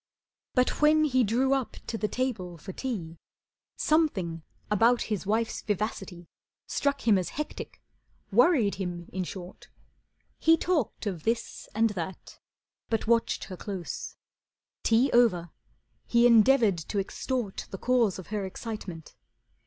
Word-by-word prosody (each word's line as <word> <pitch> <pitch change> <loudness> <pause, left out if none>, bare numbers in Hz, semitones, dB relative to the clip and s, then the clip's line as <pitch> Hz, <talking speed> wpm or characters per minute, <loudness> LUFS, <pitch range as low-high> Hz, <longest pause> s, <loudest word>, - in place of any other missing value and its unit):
But 250 +3 +2
when 305 +1 +5
he 260 -4 +3
drew 250 +5 +2
up 270 -3 -1
to - - -4
the 215 -1 -1
table 210 -9 -3
for 185 +4 -8
tea 175 -12 -5 0.6
Something 200 - +1 0.3
about 230 +4 +4
his 195 -2 -4
wife's 225 +2 0
vivacity 195 -4 -3 0.4
Struck 280 -3 -1
him 205 -4 +6
as 180 - -3
hectic, 300 +1 -6 0.5
worried 240 - +4
him 175 -2 -4
in 185 0 -1
short. 180 0 -9 0.7
He 325 0 +5
talked 315 - -1
of 185 -6 -3
this 230 +6 -2
and 225 0 +3
that 185 -1 -6 0.5
but 225 -1 0
watched 230 0 +2
her 185 - -7
close. 190 -3 -5 0.7
Tea 235 +4 +3
over, 180 -9 +3 0.6
he 235 0 +4
endeavoured 230 -4 +5
to 165 +6 -5
extort 210 +2 -3
The 195 - -6
cause 240 -3 +2
of 185 - -8
her 210 -2 -1
excitement. 190 -4 -7
220 Hz, 135 wpm, -28 LUFS, 185-250 Hz, 0.7 s, him